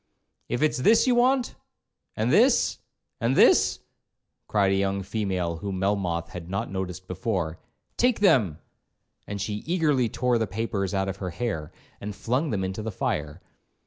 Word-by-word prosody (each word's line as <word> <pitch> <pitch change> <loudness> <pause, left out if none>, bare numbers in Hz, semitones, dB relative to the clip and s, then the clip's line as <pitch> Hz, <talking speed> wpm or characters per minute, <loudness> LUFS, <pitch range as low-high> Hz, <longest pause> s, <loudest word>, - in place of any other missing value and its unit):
'If 120 +4 0
it's 150 -3 +1
this 220 - +5
you 255 - +3
want—and 250 +1 -1
this—and 120 +3 +1
this,' - - +5 0.7
cried 100 -2 +2
a - - +2
young 100 0 0
female 95 -5 -2
whom 95 +2 -4
Melmoth 90 -4 -1
had 85 -1 -8
not 95 0 -3
noticed 95 -1 -5
before, 90 -4 -2 0.4
'take 245 -1 +2
them;' 115 - +3 0.7
and 100 0 -5
she 105 +1 -2
eagerly 150 -8 +2
tore 125 +1 +1
the 110 - 0
papers 100 -1 -2
out 95 0 0
of 95 0 -4
her 95 -2 -4
hair, 85 -5 -4 0.3
and 105 0 -5
flung 125 +9 -1
them 100 -6 -1
into 95 +3 -3
the 110 - -3
fire. 75 -3 -3
100 Hz, 150 wpm, -26 LUFS, 95-120 Hz, 0.7 s, this